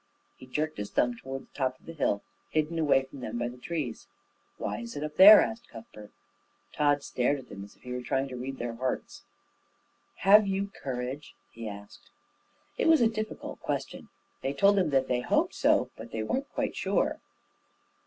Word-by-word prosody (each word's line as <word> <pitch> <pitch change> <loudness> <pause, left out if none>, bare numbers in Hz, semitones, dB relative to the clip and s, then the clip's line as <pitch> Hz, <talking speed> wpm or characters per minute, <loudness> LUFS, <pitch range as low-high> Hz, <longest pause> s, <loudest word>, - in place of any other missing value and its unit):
He 130 - -14
jerked 155 +2 -2
his 105 - -4
thumb 120 0 +1
toward 135 +3 -7
the - - -27
top 130 -2 -2
of - - -25
the 165 - -8
hill, 130 -9 0 0.3
hidden 155 +1 0
away 145 -4 +3
from 135 +1 -12
them 120 -2 -5
by 120 0 -1
the 125 - -11
trees. 145 -6 -4 0.5
"Why 105 - -3
is 115 +2 -7
it 145 - -4
up 150 0 -5
there?" 205 +4 +11
asked 235 +1 -6
Cuthbert. 110 -2 -12 0.6
Tod 145 -1 +2
stared 130 +3 0
at 130 -2 -12
them 100 - -8
as 100 - -13
if - - -28
he 125 - -8
were 125 - -3
trying 135 +2 -1
to 130 - -7
read 130 +2 -5
their 120 -1 -4
hearts. 125 +2 -4 1.0
"Have 205 +2 +7
you 195 +1 -1
courage?" 130 +2 -5 0.2
he 115 -1 -6
asked. 100 0 -12 0.7
It - - +2
was 320 -3 +6
a 235 - +6
difficult 215 -1 -5
question. - - -4 0.3
They 135 - -2
told 200 +6 +4
him 180 -5 +1
that 135 -2 +2
they 125 -1 0
hoped - - +1
so, - - +2
but - - -9
that - - -17
they 110 -1 -2
weren't 270 - -2
quite - - -2
sure. - - 0
135 Hz, 200 wpm, -29 LUFS, 120-160 Hz, 1.0 s, there